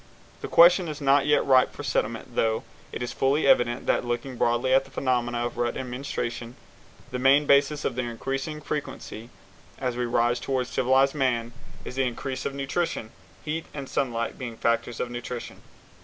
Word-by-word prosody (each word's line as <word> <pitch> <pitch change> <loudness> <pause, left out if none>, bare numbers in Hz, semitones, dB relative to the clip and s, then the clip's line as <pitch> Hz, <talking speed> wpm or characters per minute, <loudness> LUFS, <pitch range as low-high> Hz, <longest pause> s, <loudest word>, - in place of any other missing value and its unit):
The - - -4
question 175 +1 +6
is 150 -1 -5
not 140 0 +3
yet 150 - +3
ripe 130 -1 +4
for - - -8
settlement, 115 -3 -2
though 110 -1 +1 0.3
it - - -4
is 120 - -4
fully 140 +3 +1
evident 120 -2 +3
that, - - +2
looking 120 +2 -3
broadly 120 +2 +1
at 135 0 +5
the - - -16
phenomena 120 -2 0
of 120 - -5
rut 120 -1 0
and 125 -1 -5
menstruation, 120 -2 -4 0.6
the 125 - -3
main 135 +3 +5
basis 140 +1 +3
of - - 0
their 125 0 -2
increasing 135 +6 -4
frequency 130 -6 -5 0.5
as 125 -2 -2
we 125 0 -1
rise 120 0 +1
toward 130 -1 -1
civilized 130 +2 +2
man 120 -5 0 0.3
is 130 - -5
increase 130 +1 -2
of 135 - -6
nutrition, 140 -4 -2 0.3
heat 160 +1 -3
and 140 -2 -5
sunlight 120 -4 -2
being 120 -3 -6
factors 115 0 0
of 120 - -3
nutrition. 120 0 -6
125 Hz, 175 wpm, -26 LUFS, 120-140 Hz, 0.6 s, question